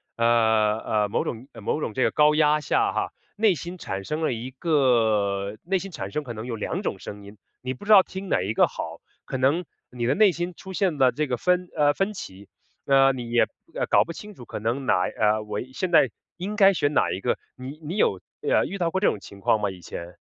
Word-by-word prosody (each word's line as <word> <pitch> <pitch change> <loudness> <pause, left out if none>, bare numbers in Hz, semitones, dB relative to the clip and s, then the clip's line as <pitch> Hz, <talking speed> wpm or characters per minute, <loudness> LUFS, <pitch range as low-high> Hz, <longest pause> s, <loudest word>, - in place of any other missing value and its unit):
呃， 110 -2 +3
呃， 105 -2 0
某 - - 0
种 120 +2 -5
某 - - -2
种 110 - -3
这 130 - +1
个 - - +2
高 150 0 +4
压 150 0 +4
下 150 - +1
哈， - - -1 0.2
内 210 -3 +3
心 175 +3 -7
产 95 - -5
生 155 +9 -3
了 155 - +1
一 120 +3 -6
个 110 - +1
内 190 +2 0
心 195 +1 -7
产 100 - -6
生 150 +5 -2
可 120 - -6
能 110 +1 -7
有 120 - -4
2 110 - -3
种 - - -3
声 105 0 -9
音， 100 +1 -13 0.2
你 130 +1 -3
不 130 - -12
知 215 - +1
道 195 -3 +9
听 190 0 -7
哪 - - +2
一 100 +4 -2
个 - - +4
好。 80 +1 -7 0.2
可 130 - -3
能 140 +7 +2 0.3
你 120 -1 -4
的 125 - +3
内 205 +2 +5
心 175 +2 -4
出 190 0 -9
现 185 -5 0
了 130 -2 +5
这 150 - -1
个 125 -2 -1
分 180 +6 +1
呃， 145 -1 +4
分 195 +2 -1
歧， 100 - -9 0.4
呃， 135 0 +5
你 120 -2 -6
也 120 - +4 0.4
搞 - - +5
不 170 - -8
清 210 +5 -10
楚 120 - -11
可 - - -6
能 120 +5 -2
哪 90 -7 +3
呃， 110 +2 +1
我 105 - -4
现 185 - -2
在 165 - +5 0.3
应 195 +4 -4
该 195 -2 +6
选 145 -3 0
哪 - - +3
一 95 - -3
个。 - - 0 0.2
你 135 +4 -8
你 160 +5 -5
有， 100 - +2 0.2
呃， - - +2
遇 200 - -5
到 170 -3 0
过 190 - 0
这 200 - +3
种 - - 0
情 100 - -12
况 105 +2 +2
吗 105 - +1
以 90 - -11
前？ 85 0 -8
130 Hz, 255 characters per minute, -25 LUFS, 110-175 Hz, 0.4 s, 道